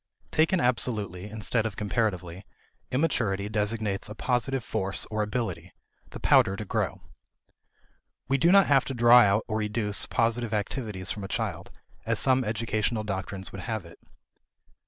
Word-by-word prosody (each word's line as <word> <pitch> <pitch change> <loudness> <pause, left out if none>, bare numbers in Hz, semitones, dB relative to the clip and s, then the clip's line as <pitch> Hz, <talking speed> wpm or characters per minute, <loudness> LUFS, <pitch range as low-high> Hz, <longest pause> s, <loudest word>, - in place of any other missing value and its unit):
Taken 165 +4 +3
absolutely, 105 -6 -1
instead 110 +1 -1
of 105 - -7
comparatively, 95 -4 -2 0.5
immaturity 115 -9 0
designates 105 -1 -1
a 105 - -7
positive 125 +2 -1
force 95 -2 -3
or 110 0 0
ability, 110 +3 -3 0.4
the - - -9
pouter 95 - +4
to - - -6
grow. - - -2 1.3
We 135 +1 +1
do 170 +6 +4
not 195 -1 +7
have 135 -2 +4
to 135 - -4
draw 120 +1 +7
out 100 0 +3
or 110 -1 -1
educe 105 -1 0
positive 115 -1 0
activities 105 -3 -2
from 105 - -5
a - - -4
child, - - -3 0.3
as - - 0
some 130 -1 +3
educational 110 0 -1
doctrines 95 -1 -5
would 95 - -7
have 110 -2 -4
it. 85 - -14
110 Hz, 150 wpm, -27 LUFS, 100-120 Hz, 1.3 s, not